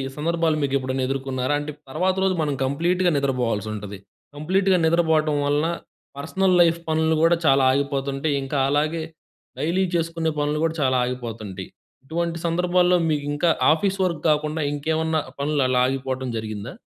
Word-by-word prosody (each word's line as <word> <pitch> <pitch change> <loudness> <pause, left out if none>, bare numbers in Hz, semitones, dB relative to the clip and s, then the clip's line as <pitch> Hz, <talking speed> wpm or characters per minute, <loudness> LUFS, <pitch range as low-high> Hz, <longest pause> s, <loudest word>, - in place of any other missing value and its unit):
సందర్భాలు 165 0 0
మీకు 140 -1 -1
ఎప్పుడన్న 130 0 -2
ఎదుర్కొన్నారా? 135 0 -1
అంటే 150 +1 -5 0.2
తర్వాత 185 +6 0
రోజు 190 -1 +2
మనం 145 -2 0
కంప్లీట్‌గా 175 +6 +1
నిద్రపోవాల్సి 120 -6 -1
ఉంటది. 105 -1 -7 0.4
కంప్లీట్‌గా 185 +5 +2
నిద్రపోవటం 160 -2 +2
వలన 145 +3 +1 0.5
పర్సనల్ 185 +5 +1
లైఫ్ 170 0 +3
పనులు 160 0 +2
కూడా 170 +1 +5
చాలా 135 -1 +4
ఆగిపోతుంటాయి. 140 +1 -1
ఇంకా 140 +1 -3
అలాగే 155 +3 0 0.6
డైలీ 175 +5 +1
చేసుకునే 165 -1 -1
పనులు 150 +1 0
కూడా 165 0 0
చాలా 130 -1 +2
ఆగిపోతుంటాయి. 115 -6 -6 0.4
ఇటువంటి 170 +2 -2
సందర్భాల్లో 180 +1 +2
మీకు 145 -2 -1
ఇంకా 165 +3 +1 0.2
ఆఫీస్ 195 +4 -1
వర్క్ 165 -4 -2
కాకుండా 150 +1 0
ఇంకేమన్నా 160 +2 0 0.2
పనులు 145 0 0
అలా 125 -1 +2
ఆగిపోవటం 130 -1 -3
జరిగిందా? 110 -2 -6
150 Hz, 140 wpm, -23 LUFS, 135-165 Hz, 0.6 s, కూడా